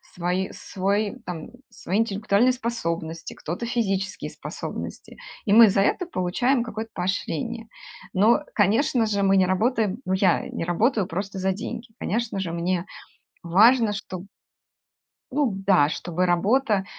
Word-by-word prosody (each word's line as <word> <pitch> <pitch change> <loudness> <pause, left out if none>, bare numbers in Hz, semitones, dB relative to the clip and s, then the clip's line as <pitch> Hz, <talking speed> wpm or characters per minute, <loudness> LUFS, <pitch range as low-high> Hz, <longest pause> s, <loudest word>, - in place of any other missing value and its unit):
свои 180 +2 -1
свой, 200 +4 -2
там, 165 -3 -6 0.2
свои 190 +5 -2
интеллектуальные 215 +2 +2
способности, 170 -9 -4
кто-то 180 +9 -5
физические 195 -5 -2
способности, - - -7 0.3
и 205 - +2
мы 230 0 +9
за 195 0 +2
это 355 - +1
получаем 245 - +1
какое-то 225 -1 -6
поощрение. 200 +4 -3 0.5
Но, 220 +9 +4
конечно 225 +4 +3
же, 205 -2 0
мы 195 0 +4
не 185 - +5
работаем, 215 +2 +1
ну, 185 - 0
я 190 0 +2
не - - -4
работаю 210 +5 +1
просто 195 +3 -4
за 190 0 +1
деньги, 230 +4 -6
конечно 220 -1 -2
же, 185 -3 -3
мне 175 +1 -1 0.6
важно, 215 +6 +5
чтоб 190 -2 -6 1.1
ну 280 -2 +1 0.2
да, 180 -7 +5
чтобы 175 +3 -2
работа 200 +3 +2
200 Hz, 135 wpm, -24 LUFS, 185-230 Hz, 1.1 s, мы